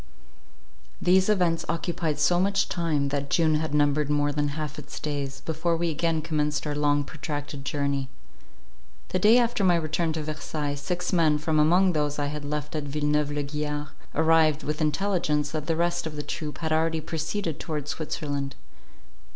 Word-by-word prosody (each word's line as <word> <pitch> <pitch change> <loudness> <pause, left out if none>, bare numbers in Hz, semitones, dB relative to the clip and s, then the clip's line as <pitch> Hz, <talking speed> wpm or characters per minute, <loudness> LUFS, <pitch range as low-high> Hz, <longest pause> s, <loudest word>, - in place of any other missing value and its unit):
These 185 +2 +4
events 180 -5 +2
occupied 165 -2 -1
so 175 +3 +3
much 195 +1 +2
time, 155 -5 0
that 140 0 -2
June 160 0 +3
had 155 0 0
numbered 145 0 +2
more 145 0 +2
than 145 0 0
half 150 -1 -4
its 145 0 -8
days, 140 -2 -3
before 165 +2 -1
we 170 0 0
again 160 0 0
commenced 150 -2 -1
our 150 - -1
long 145 0 +2
protracted 145 -1 -5
journey. 140 -1 -1 1.0
The 185 - 0
day 215 +6 +6
after 235 -4 +2
my 180 -2 +5
return 160 0 0
to 155 -1 -3
Versailles, 150 -1 -3
six 180 +6 -3
men, 160 -4 +4
from 155 +1 +1
among 180 +4 +4
those 150 -1 0
I 145 - 0
had 150 -1 -5
left 150 +1 -4
at 150 -1 -2
Villeneuve 150 +1 0
la 145 0 -2
Guiard, 150 0 -3 0.3
arrived, 160 -1 +4
with 150 +1 -2
intelligence, 155 -2 +1
that 155 -2 -4
the 165 - +1
rest 175 0 0
of 155 - -6
the 150 - -4
troop 150 +1 -5
had 160 -1 -3
already 160 +1 +2
proceeded 160 +1 -3
towards 150 -3 -3
Switzerland. 145 -3 -3
150 Hz, 175 wpm, -26 LUFS, 145-165 Hz, 1.0 s, day